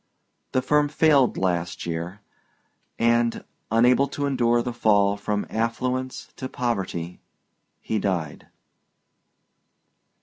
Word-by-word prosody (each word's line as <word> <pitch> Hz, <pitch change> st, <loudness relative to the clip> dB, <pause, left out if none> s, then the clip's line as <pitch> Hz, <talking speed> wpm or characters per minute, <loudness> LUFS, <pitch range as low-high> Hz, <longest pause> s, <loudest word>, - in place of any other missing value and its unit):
The 130 Hz, -, +1 dB
firm 150 Hz, +2 st, +2 dB
failed 145 Hz, -4 st, +3 dB
last 90 Hz, -2 st, -1 dB
year, 85 Hz, +4 st, -4 dB, 0.8 s
and 115 Hz, 0 st, +2 dB, 0.3 s
unable 125 Hz, +5 st, +4 dB
to 145 Hz, +1 st, -3 dB
endure 120 Hz, -4 st, +2 dB
the 125 Hz, -, -3 dB
fall 100 Hz, -3 st, +3 dB
from 105 Hz, 0 st, -2 dB
affluence 125 Hz, +3 st, -2 dB
to 130 Hz, -, -5 dB
poverty 95 Hz, -8 st, -3 dB, 0.6 s
he 110 Hz, -, -1 dB
died. 85 Hz, -7 st, -3 dB
115 Hz, 100 wpm, -24 LUFS, 100-130 Hz, 0.8 s, unable